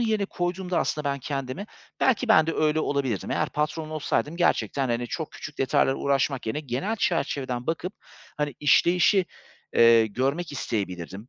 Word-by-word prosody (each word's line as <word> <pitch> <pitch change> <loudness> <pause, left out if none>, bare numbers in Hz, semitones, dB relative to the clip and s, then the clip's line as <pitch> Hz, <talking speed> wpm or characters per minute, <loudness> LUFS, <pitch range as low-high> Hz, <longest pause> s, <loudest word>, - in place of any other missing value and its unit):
yerine 220 -3 +1
koyduğumda 180 0 -2
aslında 150 - -1
ben 140 - -3
kendimi, 135 +7 -4 0.3
belki 255 -1 +2
ben 160 -7 +6
de 165 - 0
öyle 155 0 +2
olabilirdim. 135 -10 -1
Eğer - - 0
patron 155 +1 -2
olsaydım 155 +1 -1
gerçekten, 145 -6 +1
hani, 120 +1 -1
çok 160 +5 -5
küçük 150 - -9
detaylarla 135 0 +2
uğraşmak 135 -2 0
yerine 130 +8 -2
genel 145 - -2
çerçeveden 135 - -1
bakıp, 170 +4 -2 0.4
hani, 150 -2 -2
işleyişi, 175 +5 +4 0.5
eee, 115 -1 +6
görmek 140 - -2
isteyebilirdim. 100 -3 -4
150 Hz, 150 wpm, -26 LUFS, 130-175 Hz, 0.5 s, ben